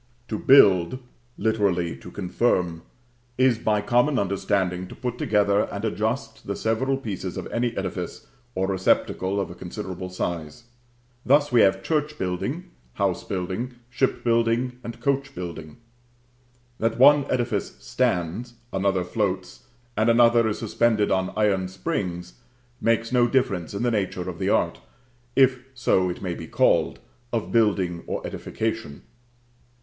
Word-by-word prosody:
To 110 - -2
build, 100 -5 +6 0.4
literally 100 -6 +1
to - - -11
confirm, 90 -3 0 0.6
is 130 -3 +3
by 105 -2 +1
common 120 +6 +2
understanding 95 -2 0
to - - -10
put 125 -1 -4
together 105 -2 +2
and 100 +2 -4
adjust 110 +4 -2
the 100 - -2
several 130 +5 0
pieces 95 -7 -5
of - - -4
any 120 0 -1
edifice - - -4 0.3
or 95 - +1
receptacle 95 0 +1
of 100 - -3
a - - -7
considerable 95 0 -6
size. 85 -2 -4 0.6
Thus 145 +2 +3
we 120 -2 +5
have 95 0 +3
church 150 +1 -1
building, 130 - -3 0.2
house - - 0
building, 95 +7 -4 0.2
ship 130 +1 0
building, 115 +2 +1
and 115 - -7
coach 140 0 -1
building. 80 -3 -7 1.0
That 115 0 0
one 140 +2 +6
edifice 120 -2 -1
stands, 90 +8 -1 0.2
another 95 -1 +1
floats, 95 0 -3 0.3
and 110 +2 +2
another 115 -1 +5
is 105 - -1
suspended 110 -1 +1
on 95 0 +1
iron 100 -3 +2
springs, 90 - -4 0.4
makes 115 +1 +1
no 120 -1 +4
difference 100 -9 0
in 100 - -2
the 120 - +2
nature 100 -4 -2
of - - -6
the - - 0
art, - - +1 0.5
if 130 -1 +5 0.2
so 95 -7 +2
it 90 - -6
may 90 -2 -2
be 80 - -8
called, - - +2 0.3
of 115 -3 -2
building 95 -7 +2
or - - -3
edification. 110 -9 -4
105 Hz, 140 wpm, -24 LUFS, 95-120 Hz, 1.0 s, build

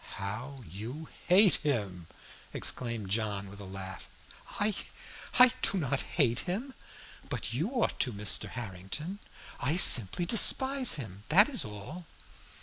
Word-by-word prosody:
"How 120 +8 -8
you 115 - -10 0.2
hate 190 +2 +4
him!" 100 - -5 0.5
exclaimed 115 -6 -4
John 100 -2 -4
with 100 - -14
a 100 - -11
laugh. 95 0 -10 0.5
"I 210 +1 -1 0.6
I 250 0 +7
do 195 - +1
not 140 -5 -3
hate 125 -7 -1
him. 240 +9 -6 0.6
But - - -6
you 155 - -3
ought 250 -3 -3
to, 125 - -2
Mr. 105 0 0
Harrington. 120 - -8 0.4
I 140 +6 -2
simply 130 - +9
despise 265 +6 +3
him, 100 -9 -10
that 200 +7 +5
is 250 - -4
all." 125 - -11
125 Hz, 135 wpm, -28 LUFS, -, 0.6 s, simply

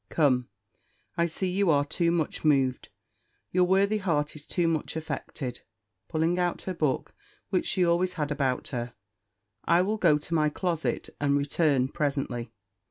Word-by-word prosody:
Come, 130 -6 +2 0.7
I 170 0 +2
see 180 +3 -2
you 195 0 +2
are 145 -2 +4
too 170 +3 0
much 165 -3 -1
moved; 135 -4 +2 0.6
your 180 0 +4
worthy 200 +3 +3
heart 155 -7 0
is 150 -1 -9
too 175 -2 +1
much 160 -2 -1
affected" 145 -5 -5 0.5
(pulling 165 +3 0
out 175 -1 -1
her 185 - -3
book, 150 -6 -1 0.4
which 185 - +1
she 185 -2 +2
always 175 +2 +2
had 150 -3 -2
about 135 -3 -1
her); 120 -3 -4 0.7
"I 170 +2 +4
will 210 +3 -1
go 165 -7 +4
to 150 +3 -6
my 155 -2 +3
closet, 170 0 -2
and 145 -1 +2
return 140 -2 +2
presently." 135 -6 -2
155 Hz, 160 wpm, -28 LUFS, 140-175 Hz, 0.7 s, are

